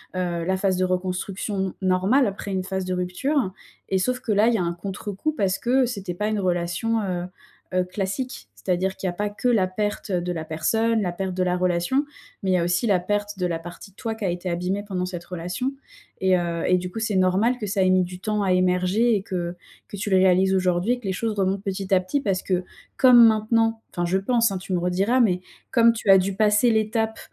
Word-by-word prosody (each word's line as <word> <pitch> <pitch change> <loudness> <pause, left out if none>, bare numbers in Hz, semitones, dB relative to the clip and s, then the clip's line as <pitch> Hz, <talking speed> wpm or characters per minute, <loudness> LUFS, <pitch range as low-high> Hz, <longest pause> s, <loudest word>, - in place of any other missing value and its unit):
Heu, 175 -2 -2
la 190 +1 +1
phase 190 -1 +1
de 185 - +2
reconstruction 185 +1 -2
normale 190 +8 +3
après 200 0 -5
une 190 -1 -1
phase 190 0 -3
de 185 - -2
rupture 185 +7 -1 0.4
et 190 - +2
sauf 250 +7 -1
que 225 - -2
là, 210 +2 +4
il 240 - +3
y - - +2
a 185 - 0
un 170 0 -1
contrecoup 200 - -4
parce 195 -8 0
que 255 +2 +2
c'était 200 -7 -4
pas 210 +4 -2
une 215 -1 -1
relation, 180 +5 0
heu 180 -2 -2 0.5
heu, 185 0 +2
classique. 195 - -4
C'est-à-dire 185 - -1
qu'il 190 - -4
y - - +1
a - - -4
pas 205 +3 -2
que 205 +4 -3
la 220 -6 +3
perte 205 +2 -3
de 180 -1 -1
la 160 -2 -3
personne, 220 +8 +1
la 180 -3 -1
perte 185 +1 -4
de 185 - -1
la 180 0 +1
relation, 180 +10 +1 0.4
mais 190 - +1
il - - +3
y - - +4
a 170 - +1
aussi 180 +6 +1
la 190 -3 +3
perte 205 +2 -2
de 180 - 0
la 170 -2 -2
partie 175 +4 -10
de - - -34
toi 225 +1 -3
qui 225 - -8
a - - +1
été 175 +1 -3
abîmée 180 +4 -2
pendant 180 -2 -2
cette 175 -2 -6
relation 180 +10 -3 0.5
et 190 -1 +4
heu 170 -1 -2
et 180 - +4
du 180 0 -5
coup, 225 - -5
c'est 220 -3 -1
normal 190 +7 +2
que 210 - -3
ça 195 0 0
ait 185 - +3
mis 185 0 +4
du 180 0 -7
temps 210 +2 -1
à 185 - +2
émerger 185 +5 +2
et 200 - 0
que 175 -2 -4 0.3
que 205 - -8
tu 205 +1 -3
le 190 - +5
réalises 190 0 +4
aujourd'hui 185 +4 +1
et 245 - -4
que 225 - -13
les 190 - -1
choses 225 +4 -2
remontent 195 -1 0
petit 195 -1 -4
à 185 - +6
petit. 230 +10 -2
Parce 195 -5 0
que, 185 -1 0 0.3
comme 245 -3 +8
maintenant 225 +1 +1
enfin, 175 0 -2
je 185 +2 +1
pense, 230 +2 +2
hein, 195 - -2
tu 190 0 -9
me 180 - +1
rediras 190 +8 +1
mais 185 -7 +3 0.3
comme 235 -1 +5
tu 220 -3 -4
as 195 - +9
dû 190 +1 -2
passer 210 +3 +4
l'étape 220 0 0
190 Hz, 245 wpm, -24 LUFS, 180-215 Hz, 0.5 s, as